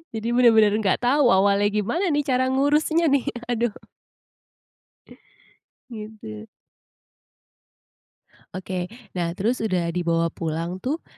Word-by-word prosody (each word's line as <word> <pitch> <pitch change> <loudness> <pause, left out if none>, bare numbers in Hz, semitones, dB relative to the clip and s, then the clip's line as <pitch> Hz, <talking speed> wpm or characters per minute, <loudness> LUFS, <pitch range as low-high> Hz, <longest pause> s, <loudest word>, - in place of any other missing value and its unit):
Jadi 225 +2 -3
bener-bener 225 -4 +5
nggak 205 +3 0
tahu 270 +2 +3
awalnya 200 0 +3
gimana 215 - -1
nih, 295 -2 +1
cara 260 -2 +1
ngurusnya 300 +4 +2
nih, 280 -3 +1 0.2
aduh. 235 -2 -1 2.2
Gitu. 210 - -9 2.1
Oke, 185 -1 -4 0.2
nah 170 -1 -3
terus 230 +6 -1
udah 180 -6 -1
dibawa 170 -1 0
pulang 165 +3 -4
tuh, 290 - -3
215 Hz, 100 wpm, -23 LUFS, 180-260 Hz, 2.2 s, bener-bener